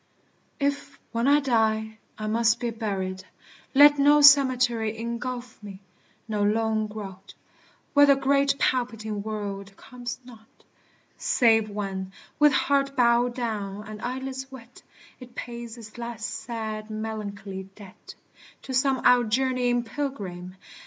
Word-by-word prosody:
If, 280 0 -2
when 230 +3 0
I 290 +1 +6
die, 220 -4 0 0.2
I 215 - -5
must 225 +1 +2
be 240 -1 -2
buried, 195 -4 -4 0.5
let 290 +1 +8
No 295 +1 +6
cemetery 250 -6 +5
engulph 240 +1 -5
me 200 -2 -10 0.5
no 210 -2 -2
lone 220 +1 +1
grot, 200 -3 -9 0.6
Where 285 -1 +7
the 280 - +6
great 275 +1 +2
palpitating 225 -6 -1
world 200 -2 -6
comes 245 -2 -7
not, 225 -3 -17 0.6
Save 225 -3 +3
when, 195 -2 -5 0.3
with 295 0 +6
heart 275 0 +1
bowed 240 -1 +3
down 210 -4 -4
and 215 0 -9
eyelids 265 +1 -5
wet, 250 -2 -13 0.4
It 250 -2 -13
pays 235 -1 -7
its 215 -2 -12
last 235 -2 -5
sad 220 -2 -5
melancholy 205 -3 -6
debt 200 -3 -13 0.5
To 265 - -6
some 260 0 +1
outjourneying 245 0 +3
pilgrim. 195 -10 -5
230 Hz, 125 wpm, -26 LUFS, 215-255 Hz, 0.6 s, let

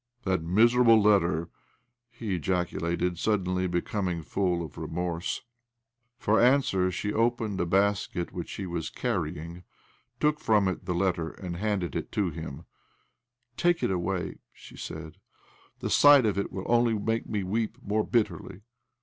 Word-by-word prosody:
" 120 - -43
That 95 -4 0
miserable 115 +6 +5
letter 95 -6 +3
I - - -12 0.3
" 120 0 -47
he 120 -4 -5
ejaculated, 90 0 -1
suddenly 95 -3 0
becoming 90 -1 -2
full 90 -1 -1
of 75 - -12
remorse. 85 +1 -3 0.7
For 110 -3 +2
answer 120 -8 +3
she 105 +3 -3
opened 115 -3 0
a 85 - -1
basket 95 -2 0
which 90 -2 -5
she 100 - -5
was 85 -3 -3
carrying!, 85 -6 -3 0.6
took 150 0 +2
ffom 105 -3 +3
it 95 - -8
the 90 -2 -1
letter, 85 -3 0
and 90 -1 -7
handed' 100 -2 -2
it - - -4
to 100 -5 0
him, 80 -3 -7 0.4
" 120 +1 -54 0.2
Take 175 0 +2
it - - +1
away," 90 -1 -2
she - - -15
said. 80 +2 -8 0.3
" - - -31
The - - -2
sight 145 -3 +7
of 105 - +1
it 100 - -2
will 95 - -5
only 120 -1 +3
make 110 +2 -2
me 105 -3 -1
weep 110 +4 -2
more 105 +1 0
bitterly." 100 -4 -1
95 Hz, 160 wpm, -28 LUFS, 85-115 Hz, 0.7 s, sight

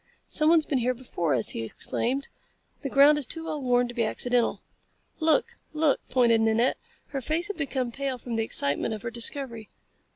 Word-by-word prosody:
"Someone's 315 0 +3
been 275 - 0
here 250 +1 0
before 175 - -2
us," 115 - +3
he - - 0
exclaimed. 255 - -3 0.5
"The 275 - -3
ground 285 +3 +6
is 275 - -4
too 325 +3 -3
well 310 -2 -4
worn 245 -1 +2
to 240 - -8
be 235 -1 0
accidental." 245 +2 0 0.6
"Look! 320 +10 +2 0.2
Look!" 305 -2 +2
pointed 235 -3 +3
Nanette. 225 +3 +2 0.3
Her 275 - -4
face 320 +8 -1
had 410 - -4
become 265 -5 -2
pale 270 +1 -3
from 240 -1 -6
the 225 - +1
excitement 145 +1 -1
of 215 - -10
her 235 - -4
discovery. 235 -1 0
250 Hz, 185 wpm, -26 LUFS, 230-290 Hz, 0.6 s, ground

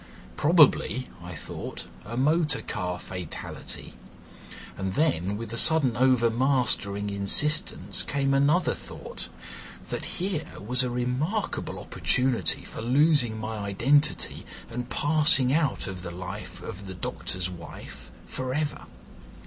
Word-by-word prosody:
Probably, 145 - +3
I 90 0 -8
thought, - - -7 0.2
a 115 +3 -6
motor 150 +2 +2
car 90 0 -3
fatality; 90 -3 -7 0.8
and 95 -1 -3
then, 105 - +1
with 115 0 -7
a 115 - 0
sudden 150 -7 +6
overmastering 120 -5 +2
insistence, 125 +10 +3
came 140 -1 0
another 145 +6 +3
thought, 485 - -6 0.6
that - - -4
here 180 -3 -2
was 125 +5 +3
a 125 - 0
remarkable 125 - -2
opportunity 125 -1 +1
for - - -8
losing 130 -1 +3
my 110 0 -4
identity 130 +9 +1 0.3
and 125 +1 -5
passing 145 -3 +4
out 155 -2 0
of 95 -1 -6
the 90 - -6
life 90 0 -8
of 100 +1 -8
the 95 - -6
doctor's 90 0 -3
wife 80 -7 -10 0.2
for 130 0 -3
ever. 150 -1 -3
125 Hz, 120 wpm, -26 LUFS, 100-145 Hz, 0.8 s, sudden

